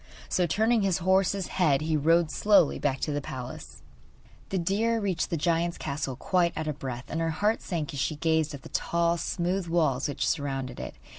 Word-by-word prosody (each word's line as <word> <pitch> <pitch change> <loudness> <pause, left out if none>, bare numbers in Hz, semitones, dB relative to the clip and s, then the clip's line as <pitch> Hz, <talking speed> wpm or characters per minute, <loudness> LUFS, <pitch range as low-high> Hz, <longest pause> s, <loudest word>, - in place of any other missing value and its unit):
So, 180 -1 +2
turning 220 +7 +2
his 195 -3 +2
horse's 190 +1 +2
head, 155 -8 +2
he 155 0 0
rode 165 +2 +3
slowly 200 -7 +4
back 135 -2 -1
to 150 - -1
his 145 0 -1
palace. 100 - -8 0.7
The 195 - -1
deer 210 +6 +1
reached 190 -5 -1
the 170 - -1
giant's 170 +2 0
castle 140 -2 -3
quite 175 +4 +1
out 155 - -2
of 150 -2 -3
breath, 125 -2 -5
and 160 - -3
her 165 - +1
heart 205 +8 0
sank 160 -6 -3
as 140 - -4
she 155 +3 0
gazed 160 -1 +1
at 135 - -12
the - - -10
tall, 170 0 +1
smooth 180 +2 -1
walls 155 -6 +1
which 145 - -2
surrounded 135 -4 -2
it. - - -6
165 Hz, 200 wpm, -28 LUFS, 145-185 Hz, 0.7 s, slowly